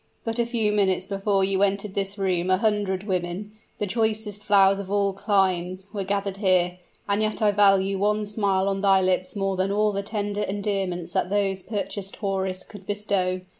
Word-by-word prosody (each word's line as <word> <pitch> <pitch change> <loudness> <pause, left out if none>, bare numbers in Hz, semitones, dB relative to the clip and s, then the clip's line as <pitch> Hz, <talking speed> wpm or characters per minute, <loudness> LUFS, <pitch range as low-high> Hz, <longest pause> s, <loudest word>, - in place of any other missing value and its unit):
"But 225 +1 -2
a 235 - +1
few 225 -3 +1
minutes 190 -3 +1
before 195 0 0
you 190 0 +1
entered 200 0 0
this 195 0 -1
room 185 -2 0
a 185 - +4
hundred 205 -3 0
women 185 +1 -3 0.3
the 210 - -1
choicest 215 0 -1
flowers 195 -1 +4
of 195 -1 -6
all 200 -1 +1
climes 190 -2 0
were 200 -2 -2
gathered 200 0 -2
here; 180 -3 +2 0.3
and 200 +1 +1
yet 215 0 -1
I 210 -2 +3
value 195 -1 +3
one 210 +1 +1
smile 200 -2 0
on 195 0 -1
thy 195 -1 +5
lips 185 +7 0
more 195 -1 -1
than 190 +1 0
all 210 +1 +2
the 200 0 -2
tender 205 0 -3
endearments 195 -3 -2
that - - 0
those 195 -1 0
purchased 200 -1 -4
houris 190 -2 -2
could 205 -3 -13
bestow. 195 -3 -1
195 Hz, 185 wpm, -25 LUFS, 190-205 Hz, 0.3 s, thy